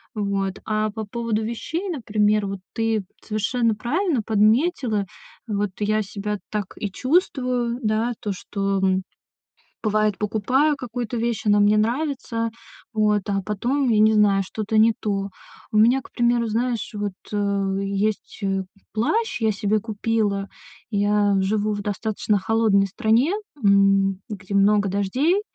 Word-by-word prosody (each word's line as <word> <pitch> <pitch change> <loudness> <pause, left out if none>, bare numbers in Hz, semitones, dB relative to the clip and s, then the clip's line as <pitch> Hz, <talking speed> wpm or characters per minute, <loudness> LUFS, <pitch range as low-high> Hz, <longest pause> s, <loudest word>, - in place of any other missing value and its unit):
Вот, 195 -2 -1
а 215 0 0
по 220 0 -5
поводу 225 0 -2
вещей, 325 - -3
например, 210 - +1
вот, 195 -1 -4
ты 225 -3 0 0.2
совершенно 225 +2 0
правильно 280 - 0
подметила. 220 - +2 0.4
Вот, 205 -2 -1
я 215 +1 +1
себя 210 0 -4
так 210 -3 -2
и 205 -3 -3
чувствую, 255 - 0
да, 220 +3 +1
то, 205 - -2
что, 195 +1 -2
м, 190 0 +1 0.8
бывает, 215 -1 +1
покупаю 250 +8 +1
какую-то 245 -1 -4
вещь, 230 -1 -1
она 205 0 +4
мне 205 +1 +4
нравится. 235 -1 -1 0.4
Вот, 210 -2 +2
а 195 -1 0
потом, 245 +6 0
я 215 -2 +3
не 215 +1 +5
знаю, 205 -2 +4
что-то 215 +3 -2
не 225 +1 +6
то. 200 -2 -1 0.5
У - - +3
меня, 240 +5 +5
к - - -15
примеру, 235 -1 +2
знаешь, 235 +1 -1
вот, 205 -1 -2 0.2
э, 200 -1 0
есть, 200 +3 -2
э, 195 -1 0 0.3
плащ, 275 - 0
я 220 -1 +3
себе 210 +1 0
купила. 210 -2 -1 0.4
Я 205 0 +2
живу 210 +2 0
в 205 - -3
достаточно 210 0 -1
холодной 210 -1 +2
стране, 235 - +2 0.3
м, 195 -1 +4
где 200 -1 -5
много 200 0 +4
дождей. 255 - +1
215 Hz, 140 wpm, -23 LUFS, 200-235 Hz, 0.8 s, не